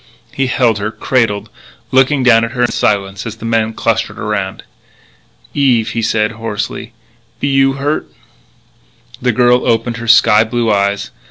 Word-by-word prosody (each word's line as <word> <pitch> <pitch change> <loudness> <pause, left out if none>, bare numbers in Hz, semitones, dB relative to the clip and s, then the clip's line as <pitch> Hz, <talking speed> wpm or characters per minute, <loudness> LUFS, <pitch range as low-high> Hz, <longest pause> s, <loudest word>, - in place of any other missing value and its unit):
He 135 -1 0
held 120 -3 +1
her, 100 +1 -2
cradled, 110 -3 -1 0.4
looking 135 +1 +3
down 115 -2 +5
at 115 +1 -3
her 125 - -2
in 120 - +1
silence 100 0 -1
as 110 - -6
the 115 - -10
men 115 -1 0
clustered - - -1
around. 100 -3 -3 0.9
"Eve," 125 -6 +2
he 115 - -2
said 110 0 0
hoarsely, 110 0 -5 0.5
"be - - -1
you 135 0 +3
hurted?" 140 +3 -2 1.1
The 125 0 +2
girl 125 +1 +3
opened 115 +1 0
her 115 0 -7
sky 115 -1 +5
blue 115 0 -1
eyes. 100 0 -1
115 Hz, 155 wpm, -15 LUFS, 105-125 Hz, 1.1 s, down